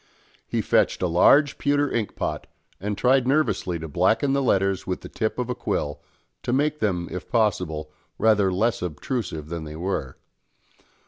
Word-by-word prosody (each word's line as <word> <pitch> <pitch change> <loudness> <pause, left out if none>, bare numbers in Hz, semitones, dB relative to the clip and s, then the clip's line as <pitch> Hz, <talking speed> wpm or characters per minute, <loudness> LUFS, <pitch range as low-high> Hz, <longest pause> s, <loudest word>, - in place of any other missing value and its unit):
He - - -1
fetched - - +2
a - - +3
large 135 - +4
pewter 145 0 +1
ink 110 -3 -2
pot, - - -3 0.3
and 105 +2 -3
tried 130 +1 +3
nervously 135 - +1
to 80 0 -6
blacken 110 - +2
the 140 - +2
letters 95 -6 +1
with 90 - -2
the - - -9
tip 110 - -2
of 125 -1 -2
a 125 - -1
quill, 75 -11 -3 0.4
to - - -3
make 150 +3 +1
them, 90 -5 0
if 90 - -6
possible, 90 -9 0 0.3
rather 105 -4 +3
less 110 +6 0
obtrusive 85 - -4
than 85 -1 -4
they 75 0 -8
were. 80 -6 -3
100 Hz, 170 wpm, -24 LUFS, 85-125 Hz, 0.4 s, large